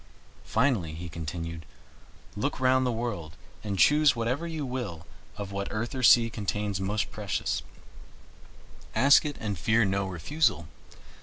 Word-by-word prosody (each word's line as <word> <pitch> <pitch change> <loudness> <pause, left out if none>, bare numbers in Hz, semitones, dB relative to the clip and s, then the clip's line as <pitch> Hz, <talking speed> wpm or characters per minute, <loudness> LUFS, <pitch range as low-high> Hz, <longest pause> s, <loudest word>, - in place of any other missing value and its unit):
Finally," 105 - +1
he 85 +2 -6
continued, 80 0 -6 0.7
"look 135 +8 -2
round 130 0 +3
the - - +1
world 110 -9 -4 0.3
and 100 -2 -3
choose 150 +4 +5
whatever 125 +8 -1
you 160 -3 -4
will 120 -11 -5 0.3
of 100 -1 -5
what 100 0 -3
earth 110 +5 -3
or 130 - -3
sea 120 -1 +7
contains 105 -2 -3
most 105 +3 -1
precious 100 -4 -2 1.3
ask 140 +3 +6
it 145 -1 -3
and 100 -5 -3
fear 110 +4 +3
no 100 0 0
refusal. 95 - 0
110 Hz, 140 wpm, -28 LUFS, 95-130 Hz, 1.3 s, sea